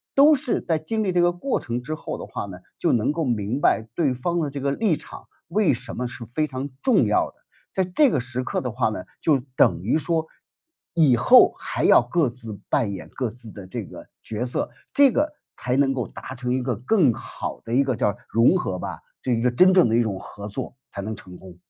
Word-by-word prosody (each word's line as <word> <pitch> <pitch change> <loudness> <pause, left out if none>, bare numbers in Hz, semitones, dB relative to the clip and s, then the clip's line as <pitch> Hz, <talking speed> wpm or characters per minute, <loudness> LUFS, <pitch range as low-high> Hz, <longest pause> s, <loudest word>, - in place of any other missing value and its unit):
都 290 +3 +7
是 260 -3 0
在 165 - 0
经 220 +7 -2
历 190 - 0
这 175 -1 +2
个 175 0 +4
过 180 +10 -2
程 120 -4 -4
之 155 +5 -5
后 - - -6
的 - - -7
话 - - -5
呢， - - -9 0.2
就 - - +2
能 120 +4 +2
够 165 +1 -2
明 120 0 -1
白 110 -5 +2
对 150 -7 +1
方 170 +8 -1
的 150 -3 -1
这 140 0 -6
个 140 +1 0
立 195 0 +1
场 - - -11 0.2
为 185 -6 +3
什 120 - -6
么 125 0 -2
是 120 -1 -9
非 155 +7 -1
常 130 +1 -4
重 260 - +4
要 - - +2
的， - - -22 0.4
在 190 - +1
这 250 +11 +3
个 - - +1
时 125 +1 -4
刻 - - -2
的 125 -3 -3
话 120 -1 +1
呢， 100 -4 -5 0.2
就 150 -4 +3 0.2
等 85 0 +3
于 125 +9 +2
说 165 0 0 0.7
以 150 -7 +5
后 120 - +7
还 - - -3
要 - - +7
各 140 +6 +1
自 115 -4 -7
扮 115 -8 +1
演 95 - -7
各 125 -4 -2
自 115 -1 -11
的 100 -3 -10
这 - - -5
个 - - -12 0.2
角 110 +2 -3
色， 125 - -2 0.2
这 280 -3 +6
个 300 +4 +1 0.2
才 125 +1 -1
能 135 -1 +3
够 125 -3 -3
达 130 - -9
成 125 -1 -4
一 130 0 0
个 125 -2 -1
更 135 - +3
好 - - -6
的 115 - -8
一 135 +3 +4
个 130 -3 -1
叫 105 -4 0
融 115 +11 +4
合 95 - -3
吧， - - -5 0.2
这 130 - -2
一 115 - 0
个 125 - +3
真 185 +10 +6
正 180 -9 +6
的 115 - +1
一 120 - +4
种 100 -5 -2
合 105 0 -9
作， 100 - -5
才 100 - -6
能 110 +1 -4
成 90 -2 -12
功。 90 -2 -13
130 Hz, 260 characters per minute, -24 LUFS, 115-165 Hz, 0.7 s, 都